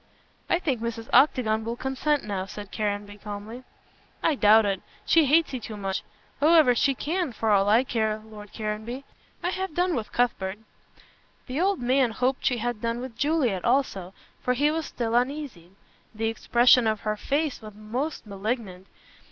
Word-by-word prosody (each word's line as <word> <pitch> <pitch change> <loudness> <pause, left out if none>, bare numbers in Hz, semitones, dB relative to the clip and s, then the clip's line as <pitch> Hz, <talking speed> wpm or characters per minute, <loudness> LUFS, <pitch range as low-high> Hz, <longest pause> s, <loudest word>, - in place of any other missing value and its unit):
"I - - +4
think 280 -10 -2
Mrs. 230 0 -4
Octagon 225 -6 +4
will 230 +1 -3
consent 265 +4 -1
now," 195 -2 -3
said 205 0 -9
Caranby, 205 -1 -3
calmly. 210 +4 -8 0.6
"I 320 - +3
doubt 220 -4 +5
it. 195 -2 -1 0.2
She 325 -2 +5
hates 310 +2 +3
you 255 - -2
too 220 -2 -8
much. 195 -1 -2 0.4
However, 310 -3 +6
she 275 +2 +2
can, 335 +2 -2
for 220 -1 0
all 200 0 +4
I 225 +4 +5
care, 220 -4 -1
Lord 210 -2 -12
Caranby. 220 +4 -4 0.4
I 355 - 0
have 380 -4 -4
done 355 0 +1
with 225 -6 -3
Cuthbert." 205 -5 0 0.9
The 270 +5 -2
old 390 +1 +2
man 255 +1 +3
hoped 255 +3 0
she 250 - +1
had 240 -1 -3
done 230 0 -1
with 250 -2 -7
Juliet 260 - +1
also, 215 -8 0 0.3
for 250 - 0
he 290 +4 +2
was 320 -1 -2
still 230 -2 -3
uneasy. 250 - -1 0.5
The 225 +1 0
expression 240 +1 +4
of 215 -1 0
her 215 -1 -1
face 285 +5 -1
was 215 -2 -10
most 240 +9 -4
malignant. 200 -2 -4
235 Hz, 170 wpm, -26 LUFS, 210-275 Hz, 0.9 s, However